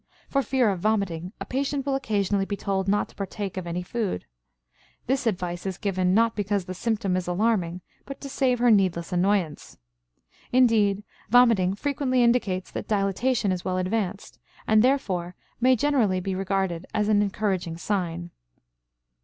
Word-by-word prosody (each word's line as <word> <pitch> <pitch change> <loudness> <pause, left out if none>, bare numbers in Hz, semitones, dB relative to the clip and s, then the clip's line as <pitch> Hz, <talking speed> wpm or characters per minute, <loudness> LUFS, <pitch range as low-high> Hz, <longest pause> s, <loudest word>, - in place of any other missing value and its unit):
For 275 - +2
fear 255 -3 +2
of 190 - -3
vomiting 185 -4 -1
a - - -5
patient 275 +1 -2
will 280 - 0
occasionally 205 -6 0
be 200 - -3
told 195 -1 -1
not 205 +1 +2
to - - -19
partake 200 0 -5
of 185 -2 -5
any 175 +1 -3
food. 205 - -3 0.8
This 265 0 0
advice 180 -3 -2
is 190 -2 -3
given, 185 -2 0
not 230 +1 +3
because 205 -2 -1
the 185 - -5
symptom 205 -1 -1
is 185 -1 -2
alarming, 180 -2 0 0.3
but 275 - -7
to 280 - -6
save 265 -2 +1
her 240 0 +4
needless 185 -5 +2
annoyance. 180 -3 0 0.7
Indeed, 220 -5 +3 0.3
vomiting 225 -6 +5
frequently 260 0 0
indicates 215 -6 +1
that - - -5
dilatation 205 +2 +1
is 180 -1 -2
well 185 -1 -1
advanced, 195 +1 -2 0.3
and, 215 0 +4
therefore, 185 -10 0 0.2
may 255 +2 +5
generally 240 -8 +2
be 190 +1 -3
regarded 190 -2 -1
as 210 -1 +1
an 210 -1 +4
encouraging 190 -5 -1
sign. 175 -2 -2
200 Hz, 160 wpm, -25 LUFS, 185-230 Hz, 0.8 s, vomiting